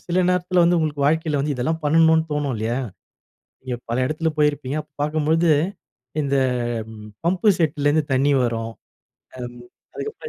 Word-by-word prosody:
சில 175 - 0
நேரத்தில 180 0 +2
வந்து 175 +1 +4
உங்களுக்கு 150 -3 -1
வாழ்க்கையில 155 0 +1
வந்து 145 +1 -1
இதெல்லாம் 160 +6 -1
பண்ணணுன்னு 160 +1 +4
தோணும் 145 -2 -1
இல்லயா! 110 +2 -1 0.9
நீங்க 130 -1 -4
பல 115 - 0
இடத்தில 155 +4 -1
போயிருப்பீங்க. 145 -2 +1
அப்ப 150 - -25
பார்க்கும்போது 155 +3 +1 0.7
இந்த 140 -1 0 0.9
பம்ப் 180 +5 0
செட்ல 150 -3 +1
இருந்து 150 +1 +3
தண்ணி 135 +2 +3
வரும். 115 -1 -2 0.7
அம், 120 -1 -7 0.4
அதுக்கப்புறம் 445 +1 -6
150 Hz, 140 wpm, -22 LUFS, 140-160 Hz, 0.9 s, வந்து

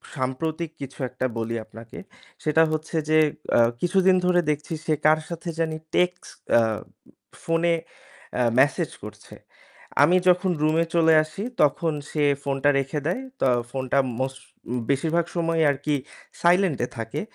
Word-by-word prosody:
সাম্প্রতিক 155 +5 -2
কিছু 135 -1 -7
একটা 130 +1 -3
বলি 115 0 -2
আপনাকে 115 +1 -12 0.5
সেটা 155 +1 +4
হচ্ছে 155 +1 -3
যে 155 0 +5 0.3
অ্যা - - +6 0.2
কিছুদিন 190 +1 +3
ধরে 180 0 +4
দেখছি 150 +2 -2
সে 155 - +2
কার 155 +1 +5
সাথে 170 0 -5
জানি 160 -1 -1 0.2
টেক্সট 180 0 0 0.2
অ্যা 115 - +6 0.8
ফোনে 165 +1 +2 0.6
অ্যা 125 - +1
মেসেজ 135 +1 +2
করছে। - - -11 0.7
আমি 175 +5 +5
যখন 180 +1 +3
রুমে 155 +2 +2
চলে 165 -1 +5
আসি 155 +6 -7 0.2
তখন 155 +3 +2 0.2
সে 150 - 0 0.2
ফোনটা 140 +1 +1
রেখে 135 +2 -2
দেয়। 180 +10 -1 0.2
তো - - +2 0.2
ফোনটা 130 +1 0 0.2
মোস্ট 130 0 -3 0.5
বেশিরভাগ 160 +5 +1
সময় 165 -1 +1
আর - - -3
কি 150 -1 +2 0.5
silent 175 -3 +3
এ - - -9
থাকে। 115 0 -4
155 Hz, 145 wpm, -24 LUFS, 135-170 Hz, 0.8 s, অ্যা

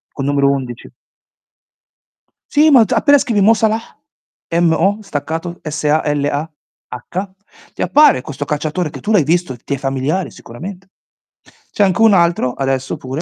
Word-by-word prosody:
Col 135 - -3
numero 140 -1 +2
11. 130 -4 -4 1.6
Sì, 305 0 +4
ma 250 -4 +7
t - - -2
appena 285 -1 +4
scrivi 225 -6 0
"Mo 220 +4 +6
Salah", 220 0 +1 0.8
M-O, 175 +4 +2
staccato 165 +1 -5
S-A-L-A-H, 150 +2 -3 0.5
ti - - -2
appare 295 - +4
questo 145 +1 -6
calciatore 155 +3 -2
che - - -10
tu 210 - -2
l'hai 205 -7 +4
visto, 165 -2 0
ti 130 +4 -5
è - - -6
familiare 135 +7 -2
sicuramente. 180 +10 -10 0.8
C'è 205 - +1
anche 190 +1 +1
un 225 -2 +6
altro 170 -8 +2
adesso 135 -1 -2
pure 135 +4 -5
160 Hz, 140 wpm, -17 LUFS, 140-195 Hz, 1.6 s, ma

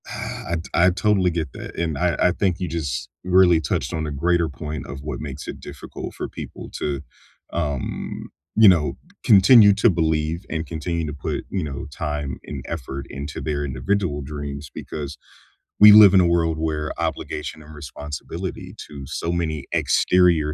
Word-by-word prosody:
Huh, 85 - -4 0.2
I 85 +2 +5
I - - +7
totally 95 0 +2
get 80 -5 -3
that, - - -9
and 80 -4 -1
I 85 +1 +1
I 90 - +4
think 95 -1 0
you 90 - -2
just 75 -6 -3
really 90 -2 +5
touched 75 - -2
on 80 -1 -2
a - - -4
greater 85 +3 +1
point 75 +1 -6
of 70 -1 -7
what 75 +2 -5
makes 70 -3 -7
it - - -6
difficult - - -8
for - - -4
people - - -9
to, 70 -2 -2 0.5
um, 75 -5 -3 0.3
you 110 -1 +7
know, 75 -8 +4 0.3
continue 100 +1 +7
to 105 +3 +4
believe 80 0 0
and 80 0 -3
continue 85 +1 -3
to 75 - -4
put, 70 - -4
you 95 -3 -1
know, 70 -2 -5
time 75 -3 -3
and - - -7
effort 70 -4 -5
into 70 +2 -6
their 75 -2 -2
individual 75 +4 -1
dreams 70 0 -6
because, 75 -1 -6 0.6
we 105 0 +11
live 105 -2 +9
in 95 - +7
a 90 - +3
world 85 -2 +1
where 80 -1 -2
obligation 80 -1 -4
and 75 0 -13
responsibility 75 0 -7
to 70 -2 -9
so 85 +5 -3
many 80 -4 -2
exterior 85 -4 +3
80 Hz, 170 wpm, -22 LUFS, 75-90 Hz, 0.6 s, we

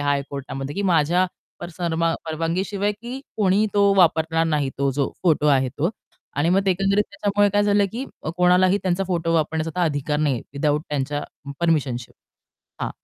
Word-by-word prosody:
हाय 145 -1 +1
कोर्टामध्ये 140 +1 -5
की 200 - -2
माझ्या 170 +3 +3 0.3
पारसा 175 0 -4 0.4
परवानगी 165 +3 -1
शिवाय 205 0 -1
की 240 +5 -8 0.2
कोणीही 205 +1 +3
तो 200 -1 +4
वापरणार 165 -3 +3
नाही 150 -3 0
तो 140 0 +2
जो 140 0 -1
फोटो 155 -4 +3
आहे 135 -2 +3
तो. 145 +7 -1 0.5
आणि 145 +4 +2
मग 190 +2 +4
ते - - +4
एकंदरीत 195 +3 +2
त्याच्यामुळे 205 0 +1
काय 205 +1 +2
झालं? 205 0 +3
की 250 +4 -4 0.3
कोणालाही 180 +2 +4
त्यांचा 185 +1 0
फोटो 170 -2 -1
वापरण्याचा 160 +2 -1
अधिकार 150 -1 -1
नाहीये, 145 -6 0
विथआऊट 150 +1 0
त्यांच्या 145 0 -2 0.4
परमिशन 150 -7 +1
शिवाय. 115 - -13 0.7
हां, - - -3
165 Hz, 165 wpm, -22 LUFS, 145-195 Hz, 0.7 s, तो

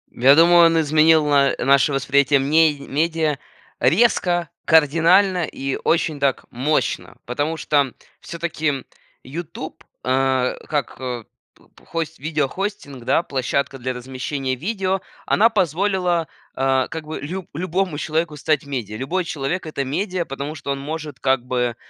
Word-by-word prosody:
Я 135 +4 +6
думаю, 170 +1 +7
он 165 0 +2
изменил 155 0 +4
на 140 -2 +3
наше 140 +3 +3
восприятие 140 +1 +3
ме 150 +2 +3
медиа 155 0 -1 0.4
резко, 175 - +2
кардинально 170 +4 +4
и 135 -1 -4
очень 160 -3 +1
так 140 -2 0
мощно, 140 +6 -1
потому 145 +6 -2
что 145 -3 +1 0.3
всё-таки 160 -5 -3 0.4
"Ютуб", 160 +2 -7 0.2
а, 130 0 +1
как 145 -5 -2
п 125 -3 -5 0.5
п - - -20
хость 165 -1 -4
видеохостинг, 155 - -3
да, - - +3
площадка 135 0 -2
для 130 0 -3
размещения 130 +2 -4
видео, 190 - -2 0.3
она 225 +3 +4
позволила, 180 -3 0 0.3
а, 135 -1 +1
как 160 -1 -6
бы 155 +1 -5
лю 175 +5 -5
любому 180 0 -1
человеку 160 0 -1
стать 150 0 0
медиа. 120 -7 -4
Любой 170 +10 -1
человек- 165 +2 -3
это 145 -3 -3
медиа, 180 +5 -2
потому 140 +2 -5
что 140 -1 -5
он 140 - -2
может 150 -1 -6
как 130 -2 +1
бы, 125 -2 -1
150 Hz, 135 wpm, -21 LUFS, 135-170 Hz, 0.5 s, думаю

